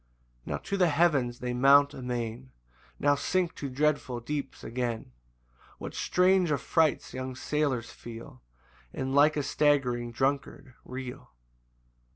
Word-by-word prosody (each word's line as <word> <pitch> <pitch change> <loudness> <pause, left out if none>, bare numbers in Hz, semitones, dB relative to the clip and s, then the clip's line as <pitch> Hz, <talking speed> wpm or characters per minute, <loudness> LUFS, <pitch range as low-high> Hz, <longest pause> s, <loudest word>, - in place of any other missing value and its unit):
3 - - -6
Now - - -1
to 200 - -4
the 180 -2 +4
heavens 145 -6 +2
they 125 0 -2
mount 140 +3 +5
amain, 125 0 -4 0.5
Now 145 0 +4
sink 175 +4 0
to 140 - -4
dreadful 135 -2 0
deeps 140 +3 -5
again; 120 - -3 0.7
What - - -7
strange 185 -1 +3
affrights 155 +2 +1
young 130 0 -5
sailors 135 -5 -1
feel, 115 - -10 0.5
And 130 0 -3
like 150 +2 +5
a 145 - 0
staggering 135 -5 +1
drunkard 135 +1 -2
reel! 130 0 -7
135 Hz, 130 wpm, -29 LUFS, 125-150 Hz, 0.7 s, mount